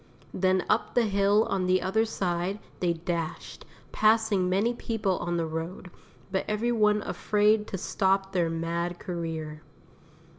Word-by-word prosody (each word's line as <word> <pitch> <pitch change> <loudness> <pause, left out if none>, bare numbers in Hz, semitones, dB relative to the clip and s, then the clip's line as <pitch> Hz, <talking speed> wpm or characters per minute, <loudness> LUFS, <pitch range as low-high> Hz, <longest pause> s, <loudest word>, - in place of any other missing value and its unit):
Then 185 0 +1
up 215 +2 0
the 240 -2 +4
hill 200 +1 +3
on 185 -2 -1
the 185 0 +3
other 195 +5 +1
side 185 -2 -2 0.2
they 175 -2 +1
dashed, 165 -1 -5 0.3
passing 215 -4 +3
many 205 +6 +2
people 220 -5 -1
on 175 0 -2
the 165 - 0
road, 165 +3 -5 0.4
but 190 - 0
every 215 +3 0
one 210 -2 +3
afraid 210 +1 +2
to 190 - -4
stop 190 +1 0
their 175 -3 +1
mad 170 +1 -2
career. 160 -4 -5
190 Hz, 145 wpm, -27 LUFS, 175-210 Hz, 0.4 s, the